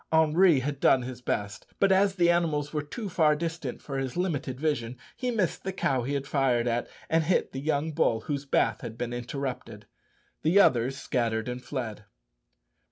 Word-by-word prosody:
Henri 160 -1 +5
had 140 +1 -3
done 130 -2 +4
his 125 0 -7
best, 105 -4 -3
but 195 - +4
as 195 0 +3
the 175 -2 +4
animals 155 -4 0
were 150 - 0
too 200 +9 -6
far 160 -5 +3
distant 165 +1 -4
for 135 -2 -4
his 135 +3 -4
limited 145 -8 -2
vision, 130 -6 -1 0.2
he 250 - -2
missed 210 -7 -1
the 190 - -2
cow 135 -8 0
he 140 +3 -1
fired 135 -4 +1
at, 120 0 0 0.2
and 160 -1 +2
hit 180 - +1
the 135 - -5
young 155 +1 0
bull 130 -8 +1
whose 140 +3 -3
bath 115 -5 +1
had 115 -2 -7
been 120 0 -3
interrupted. 120 -3 -5 0.6
The 170 +6 +4
others 130 -6 +3
scattered 115 -4 -1
and 125 0 -5
fled. 110 -7 -5
140 Hz, 180 wpm, -28 LUFS, 125-160 Hz, 0.6 s, Henri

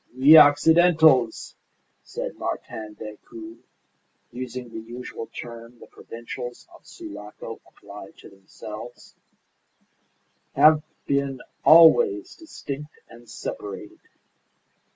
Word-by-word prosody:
"We 140 +5 +7
Occidentals," 160 -4 +5 0.5
said - - -7
Martin 110 -1 -6
Decoud, 330 - -11 0.7
using 125 0 -7
the 115 - -8
usual 115 0 -9
term 115 0 -11
the - - -14
provincials 120 +1 -10
of - - -19
Sulaco 105 +1 -10
applied - - -14
to - - -15
themselves, 105 +4 -12 1.4
"have 155 0 +5 0.2
been 140 -1 -1 0.2
always 350 - +5
distinct 150 - -9
and 120 0 -16
separated. 100 0 -8
125 Hz, 90 wpm, -23 LUFS, 115-155 Hz, 1.4 s, We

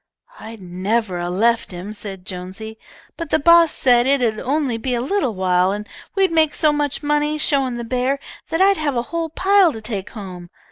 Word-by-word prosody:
"I'd 220 -3 -10
never 185 +2 -2
a 175 0 -3
left 225 +6 +1
him," 185 +3 -7
said 195 -3 -8
Jonesy, 190 +5 -7 0.4
"but 335 - -5
the - - +3
boss 335 +1 +6
said 245 -1 +3
it 280 +1 +3
'ud 215 -2 0
only 275 -3 -1
be 250 +1 -1
a - - -1
little 265 - -1
while 185 0 +2
and 210 +1 -5 0.3
we'd 385 -2 +2
make 320 -2 +2
so 305 -1 +3
much 295 0 -2
money 295 +1 +1
showin' 275 -5 +1
the 235 - -4
bear 255 +3 -1 0.3
that 325 - 0
I'd 390 0 +5
have 295 -3 -1
a 235 - 0
whole 335 -1 -1
pile 380 +2 +4
to 225 - -7
take 215 -3 -5
home. 180 -5 -9
240 Hz, 200 wpm, -20 LUFS, 200-300 Hz, 0.4 s, boss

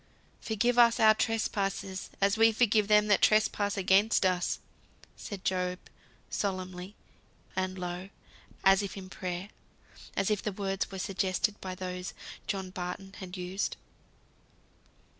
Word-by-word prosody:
"Forgive 235 +2 +1
us 235 -1 +6
our 220 -1 +7
trespasses 200 -3 -1
as 200 +1 +3
we 225 0 +6
forgive 215 -2 +3
them 210 0 +5
that 210 -1 +3
trespass 215 -1 +3
against 195 +2 +4
us," 180 -1 +1 0.6
said 200 -3 -8
Job, 180 -1 0 0.5
solemnly 185 0 -3 0.6
and 185 0 -1
low, 180 +1 -5 0.5
as 195 +1 +6
if 200 -1 -5
in 185 -1 -9
prayer; 185 +1 -4 0.7
as 195 +2 +2
if 210 - +1
the 210 - -3
words 195 0 -2
were 195 - -7
suggested 190 +2 -1
by 185 -1 -5
those 180 0 -5 0.3
John 190 -2 -3
Barton 185 +2 -5
had 185 -1 -7
used. 180 +2 -2
195 Hz, 130 wpm, -30 LUFS, 185-210 Hz, 0.7 s, our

